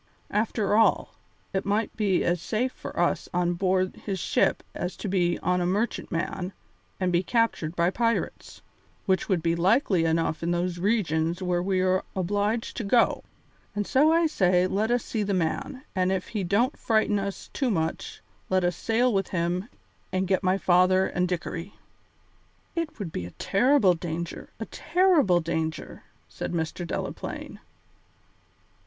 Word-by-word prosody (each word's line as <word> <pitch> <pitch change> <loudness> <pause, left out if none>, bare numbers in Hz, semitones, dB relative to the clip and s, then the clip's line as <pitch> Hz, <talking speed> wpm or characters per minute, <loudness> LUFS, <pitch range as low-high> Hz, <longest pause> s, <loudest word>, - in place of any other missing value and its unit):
After 210 -1 +1
all, 225 +1 +3 0.4
it 190 - 0
might 205 +2 -1
be 200 -4 +1
as 175 -1 0
safe 235 +7 -1
for - - -7
us - - +1
on 175 0 +2
board 185 +1 0
his 195 -2 -4
ship - - +1
as 180 +1 -4
to - - -5
be 175 -3 +1
on 180 +1 +1
a - - +1
merchantman 185 -2 -2 0.5
and 185 -1 +1
be 175 0 +3
captured 190 -6 0
by 170 +1 +2
pirates, 230 +2 -2 0.4
which 190 +1 +1
would 180 -5 +1
be 165 0 +2
likely 185 - +3
enough 165 -1 0
in 170 - -1
those 175 0 -1
regions 175 -4 0
where 180 -1 +1
we 185 0 +1
are 185 0 +2
obliged 205 +5 -1
to 235 - -2
go; 230 +3 +3 0.5
and 205 0 -1
so 295 +8 +4
I 335 +1 +4
say 185 - +3
let 205 +4 0
us 240 -1 +1
see 220 - -2
the 200 -1 0
man, 185 - -2
and 185 0 +2
if 190 -1 -2
he 210 -4 -2
don't 220 +10 +1
frighten 220 -2 +2
us 195 0 -5
too 265 -3 0
much 160 -6 -2 0.3
let 185 -1 +2
us 175 -1 +1
sail 235 +5 +1
with 195 -1 +1
him 180 +4 -1 0.4
and 185 0 0
get 190 0 +2
my 185 +1 +2
father 185 0 +4
and 180 0 0
Dickory." 175 +1 -4 1.0
"It 330 -3 -3
would 195 -7 -5
be 90 - -4
a - - -11
terrible 210 -2 +4
danger, 170 0 -5
a - - -3
terrible 325 - +3
danger," 160 -1 -3 0.3
said - - -5
Mr. 170 +1 -3
Delaplaine. - - -5
185 Hz, 160 wpm, -26 LUFS, 175-215 Hz, 1.0 s, so